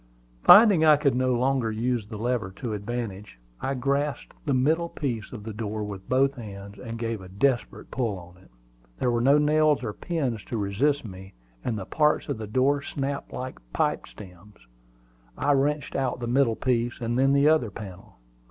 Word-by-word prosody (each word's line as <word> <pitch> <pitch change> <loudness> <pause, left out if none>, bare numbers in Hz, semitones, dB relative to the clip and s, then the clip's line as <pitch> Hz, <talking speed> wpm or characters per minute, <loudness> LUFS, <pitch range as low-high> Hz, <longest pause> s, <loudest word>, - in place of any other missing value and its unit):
Finding 205 - +8
I 155 -2 +7
could 140 -2 +2
no 130 0 +1
longer 125 -2 +1
use 115 0 -1
the 110 0 -7
lever 120 -3 -1
to 120 -1 -4
advantage, 105 - -5 0.2
I 135 - -1
grasped 140 +3 -1
the 140 - +2
middle 160 +6 +2
piece 120 -10 -4
of 110 -5 -8
the 110 0 -6
door 105 0 -4
with 100 -2 -7
both 135 +2 +3
hands, 100 -3 -9
and 115 -2 -6
gave 115 -3 -3
a 95 - -11
desperate 120 +6 -1
pull 95 -9 -3
at 95 +1 -20
it. - - -24 0.5
There 125 - +1
were 120 0 +1
no 140 +4 +5
nails 150 -1 +3
or 110 -3 -3
pins 130 - -3
to 120 - -4
resist 115 +8 0
me, 95 -1 -10 0.3
and 115 -3 -2
the 95 - -5
parts 150 +6 +1
of - - -2
the 110 - -5
door 130 +6 +2
snapped 140 0 -4
like 130 +1 -6
pipe - - 0
stems. 95 - -14 0.7
I 145 - +1
wrenched 145 +1 0
out 130 -2 -1
the 120 - -3
middle 120 -1 +2
piece, 120 -1 -1
and 120 -1 -2
then 135 +1 +4
the 140 +1 +4
other 155 -7 +3
panel. 100 -3 -10
120 Hz, 190 wpm, -26 LUFS, 105-140 Hz, 0.7 s, Finding